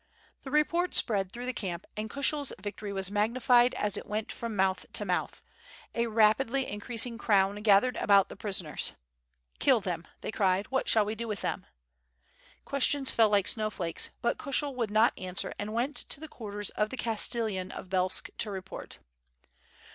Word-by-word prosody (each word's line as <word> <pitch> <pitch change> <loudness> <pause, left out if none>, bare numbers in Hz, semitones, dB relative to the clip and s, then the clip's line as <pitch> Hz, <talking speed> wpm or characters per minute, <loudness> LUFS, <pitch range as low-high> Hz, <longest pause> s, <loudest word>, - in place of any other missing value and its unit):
The 270 - -8
report 335 +5 +1
spread 195 -4 0
through 245 +1 -6
the 255 - -2
camp, 180 -6 -4
and 215 +1 -4
Kushel's 280 +1 +1
victory 205 +1 -5
was 195 -1 -2
magnified 240 +4 +3
as 210 -1 +1
it - - -7
went 210 +1 -3
from 230 -2 -5
mouth 190 -1 +1
to - - -1
mouth; - - -2 0.5
a 235 0 0
rapidly 230 +4 +3
increasing 230 +3 -2
crown 200 -3 +3
gathered 210 +4 +4
about 200 -1 +5
the - - -10
pris 195 -2 -1
oners. 150 - 0 0.7
"Kill - - +5
them," - - -4
they - - -4
cried, 195 -2 +1
"what 265 - 0
shall 215 -2 +5
we 210 - -2
do 230 +1 -5
with 210 -3 -4
them?" - - -3 1.0
Questions 280 0 +1
fell 225 -2 +4
like 200 -2 +3
snowflakes, 215 -7 -1
but 235 - +1
Kushel 280 0 0
would 235 -4 -1
not 220 +3 +4
answer 185 -1 -2
and 205 +1 -3
went 245 +6 -1
to - - -4
the 315 - -7
quarters 205 -7 -4
of 210 0 0
the 260 - -6
Castellan 220 -5 -1
of - - -8
Belsk 185 0 +1
to 215 - +1
report. 190 -2 -6
215 Hz, 175 wpm, -30 LUFS, 200-245 Hz, 1.0 s, about